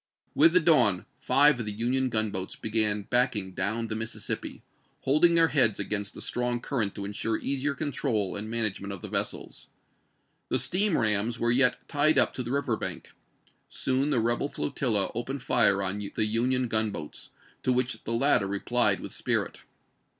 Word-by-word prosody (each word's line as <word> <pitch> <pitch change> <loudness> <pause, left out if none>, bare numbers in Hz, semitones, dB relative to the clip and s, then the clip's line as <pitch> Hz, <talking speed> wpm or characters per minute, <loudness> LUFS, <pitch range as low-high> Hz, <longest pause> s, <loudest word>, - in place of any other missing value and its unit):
With 165 +3 +5
the 180 - +7
dawn 120 - +3
five 145 -1 +4
of 115 - -3
the - - -2
Union 125 +5 0
gunboats 105 -5 -2
began 105 -2 0
backing 105 -5 0
down 110 +6 -2
the 110 -1 -4
Mississippi, 110 0 -5 0.4
holding 155 +5 +4
their 165 -1 +5
heads 125 -8 +3
against 100 -1 -2
the - - -6
strong 120 0 -1
cuiTent 115 -5 -2
to 100 - -5
insure 105 +2 -2
easier 140 +1 -1
control 130 -9 -2
and 105 +1 -5
management 110 -4 -3
of 95 - -10
the - - -5
vessels. - - -4 0.8
The - - +1
steam 195 0 +1
rams 110 +1 0
were 120 0 +1
yet 125 +1 +2
tied 150 +1 +3
up - - +5
to - - -3
the 120 - -5
river 140 -4 0
bank. - - -7 0.6
Soon 130 +3 0
the 135 -5 +2
rebel 120 +5 0
flo 145 - -3
tilla 115 -8 -1
opened 130 +3 -4
fire 100 -6 +2
on 95 +2 -3 0.2
the 110 - +1
Union 125 +4 0
gunboats, 110 -8 -4 0.3
to 130 - +1
which 125 -2 -1
the 115 - -3
latter 115 -4 +3
replied 120 +5 0
with - - -7
spirit. - - -2
115 Hz, 170 wpm, -27 LUFS, 105-135 Hz, 0.8 s, the